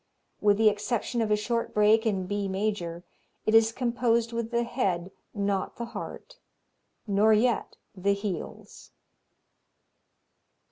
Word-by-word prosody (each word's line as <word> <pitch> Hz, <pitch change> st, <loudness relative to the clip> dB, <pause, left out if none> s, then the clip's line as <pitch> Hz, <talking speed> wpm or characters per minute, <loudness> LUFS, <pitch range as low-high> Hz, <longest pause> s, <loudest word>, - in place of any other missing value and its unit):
With 205 Hz, -1 st, +3 dB
the 220 Hz, 0 st, +4 dB
exception 215 Hz, +3 st, -2 dB
of 220 Hz, -, 0 dB
a 210 Hz, -, +4 dB
short 230 Hz, +2 st, -2 dB
break 215 Hz, +2 st, +4 dB
in 195 Hz, -4 st, 0 dB
B 205 Hz, +1 st, -2 dB
major, 190 Hz, -4 st, -2 dB, 0.4 s
it 215 Hz, -, +1 dB
is 225 Hz, 0 st, +6 dB
composed 235 Hz, -1 st, 0 dB
with 230 Hz, -1 st, -2 dB
the 235 Hz, 0 st, +1 dB
head, 190 Hz, -7 st, -1 dB, 0.2 s
not 200 Hz, -2 st, -2 dB
the 235 Hz, -, -4 dB
heart, -, -, -8 dB, 0.7 s
nor 210 Hz, +1 st, +4 dB
yet 230 Hz, +3 st, +1 dB, 0.2 s
the 200 Hz, +2 st, +1 dB
heels. 200 Hz, -4 st, -6 dB
215 Hz, 130 wpm, -27 LUFS, 200-235 Hz, 0.7 s, is